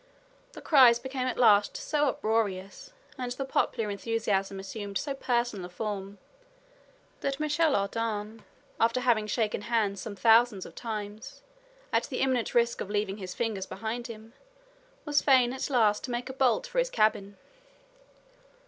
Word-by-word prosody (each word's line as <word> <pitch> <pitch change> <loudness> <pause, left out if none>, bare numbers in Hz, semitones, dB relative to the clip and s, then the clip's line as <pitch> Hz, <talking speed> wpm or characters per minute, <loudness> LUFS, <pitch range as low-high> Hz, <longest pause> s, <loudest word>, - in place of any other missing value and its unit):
The - - -10
cries 255 -6 +7
became 260 +1 -4
at 255 - -2
last 205 -4 +4
so 295 -1 0
uproarious, 220 - -2 0.3
and 250 -1 -3
the 270 +2 -4
popular 225 -4 0
enthusiasm 200 -2 -1
assumed 200 0 -5
so 280 - -3
personal 240 -8 -1
a - - -16
form, 200 +1 -5 1.0
that 275 0 -2
Michel 305 0 +2
Ardan, 215 +1 -2 0.4
after 230 +2 +2
having 230 -4 +2
shaken 215 -2 -1
hands 210 -3 0
some 210 -3 -6
thousands 225 0 +4
of - - -11
times, 215 - -7 0.5
at - - +2
the - - -4
imminent 260 -3 0
risk 235 0 +2
of - - -5
leaving 205 -1 -1
his 185 -3 -7
fingers 215 -5 -2
behind 225 +4 -5
him, 225 0 -11 0.7
was 295 -1 +2
fain 255 -3 +4
at 265 - -4
last 220 -6 +2
to - - -9
make 240 +1 -3
a - - -10
bolt 265 - +2
for - - -2
his - - +1
cabin. 205 - +1
225 Hz, 155 wpm, -28 LUFS, 205-255 Hz, 1.0 s, cries